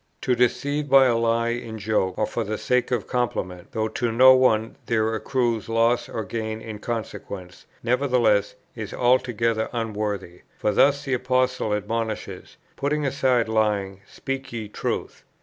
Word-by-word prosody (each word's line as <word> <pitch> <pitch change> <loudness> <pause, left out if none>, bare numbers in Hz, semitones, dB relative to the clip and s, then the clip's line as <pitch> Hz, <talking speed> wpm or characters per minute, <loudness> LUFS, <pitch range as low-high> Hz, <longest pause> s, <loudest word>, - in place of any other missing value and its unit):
"To 125 - +1
deceive 145 +4 0
by 135 0 +7
a 120 -2 +3
lie 115 0 +1
in 120 -2 -4
joke 105 -3 0
or - - +2
for 115 - -3
the 110 0 -3
sake 125 +3 +1
of 120 -5 -1
compliment, 95 -8 -2
though 110 0 -1
to 120 +1 -1
no 130 +3 +8
one 115 -4 +2
there 110 -1 +1
accrues 115 -1 -1
loss 115 +1 +2
or 110 - -3
gain 110 +2 -4
in 110 -2 -8
consequence, 100 -5 -6 0.2
nevertheless 120 -4 +2 0.2
is - - -6
altogether 120 -3 +1
unworthy: 105 -6 -3 0.2
for 105 - 0
thus 140 +7 +3
the 135 - -1
Apostle 125 -2 +1
admonishes, 110 +1 -4 0.2
'Putting 145 +1 0
aside 130 -4 +2
lying, 105 -3 0
speak 135 0 -5
ye 115 -3 -5
truth.' - - -4
115 Hz, 150 wpm, -24 LUFS, 110-125 Hz, 0.2 s, no